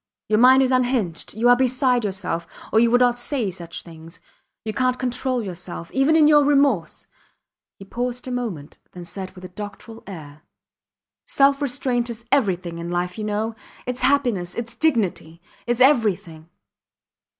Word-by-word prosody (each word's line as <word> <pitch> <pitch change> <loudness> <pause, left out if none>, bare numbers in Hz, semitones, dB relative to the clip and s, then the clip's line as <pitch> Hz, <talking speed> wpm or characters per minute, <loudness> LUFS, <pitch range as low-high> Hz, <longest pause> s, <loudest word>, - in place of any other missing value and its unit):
Your 215 0 +3
mind 260 +2 +7
is 260 - +1
unhinged. 245 -11 -1
You 230 +2 +2
are 245 - +7
beside 255 -1 +1
yourself, 185 -4 -3 0.3
or 220 - +5
you 235 +1 +4
would 245 +1 +3
not 245 -1 +3
say 245 -6 -1
such 170 -2 -8
things. 165 +1 -12 0.5
You 215 - -3
cant 255 +2 +1
control 250 -1 -1
yourself. 175 -3 -7
Even 270 +4 +3
in 310 -2 +6
your 295 -1 +6
remorse... 275 - +1 0.7
He 195 - -11
paused 245 +4 -4
a - - -4
moment, 210 -13 -5
then 180 -1 -9
said 190 +2 -6
with 185 0 -11
a - - -9
doctoral 210 +4 -9
air: 155 -6 -10 0.9
Self 275 +1 +3
restraint 250 -3 -1
is 230 0 -8
everything 185 -10 +1
in 170 0 -5
life, 175 +1 -2
you - - -3
know. 215 +2 -2 0.3
Its 250 0 -3
happiness, 245 -10 +1
its 235 0 -5
dignity... 200 - -1 0.3
its 240 0 0
everything. 200 - +2
230 Hz, 160 wpm, -22 LUFS, 180-255 Hz, 0.9 s, mind